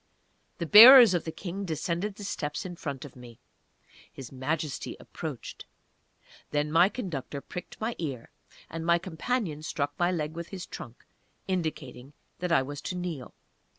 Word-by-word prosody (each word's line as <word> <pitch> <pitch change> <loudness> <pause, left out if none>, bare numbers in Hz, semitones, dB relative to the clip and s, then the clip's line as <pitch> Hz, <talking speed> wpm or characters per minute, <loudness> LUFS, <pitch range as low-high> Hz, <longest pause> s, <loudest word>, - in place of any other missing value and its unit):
The 170 - -3
bearers 230 - +10
of 175 - -1
the 160 - -3
King 190 +4 -6
descended 175 +3 -3
the 205 - -9
steps 150 -6 -4
in 180 -1 -6
front 140 -3 -6
of 145 - -12
me. 120 -2 -13 0.7
His 135 -3 -10
Majesty 145 +2 -3
approached. - - -8 0.8
Then 150 0 -1
my 170 +4 +5
conductor 160 - -5
pricked 180 +5 -9
my 225 +2 -2
ear, 135 -8 -5 0.4
and 165 0 -6
my 170 +1 +4
companion 175 -1 -3
struck 145 -2 -3
my 175 +1 +2
leg 155 -3 -2
with 170 0 -6
his 185 -2 -7
trunk, 120 +1 -10 0.4
indicating 150 -7 -4 0.3
that 180 -1 -2
I 150 -5 +4
was 145 +1 -7
to 180 - -4
kneel. 170 -8 -5
165 Hz, 155 wpm, -28 LUFS, 145-180 Hz, 0.8 s, bearers